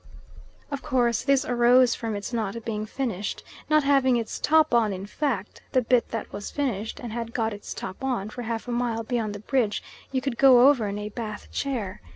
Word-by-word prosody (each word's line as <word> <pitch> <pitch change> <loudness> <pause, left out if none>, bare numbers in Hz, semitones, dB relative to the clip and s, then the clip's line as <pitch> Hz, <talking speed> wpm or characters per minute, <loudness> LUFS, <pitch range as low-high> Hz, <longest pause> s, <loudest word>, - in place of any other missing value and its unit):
Of 280 -1 -3
course 240 -3 +1
this 275 +1 +3
arose 245 -1 +5
from 225 -2 -3
its 205 +4 -5
not 225 0 -3
being 215 -1 -3
finished, 220 -6 -3 0.3
not 305 -1 +4
having 270 -3 +4
its 230 -2 -4
top 315 -2 +4
on 225 -3 +4
in 190 +1 -6
fact: 215 -3 -3
the 255 - +4
bit 245 0 +2
that 225 - -5
was 205 0 -5
finished, 225 -7 -2
and 235 -3 -6
had 230 0 -5
got 225 -2 0
its 205 - -9
top 190 +8 -6
on, 235 -6 -1
for 245 - -6
half 230 0 -4
a - - -3
mile 235 -1 -1
beyond 220 -3 -2
the - - -6
bridge, 220 -2 0 0.3
you 265 - +1
could 255 -2 -4
go 260 -2 +8
over 255 -7 +3
in 200 0 -3
a 210 0 -4
Bath 215 -2 -7
chair. 225 - -3
235 Hz, 205 wpm, -26 LUFS, 215-260 Hz, 0.3 s, go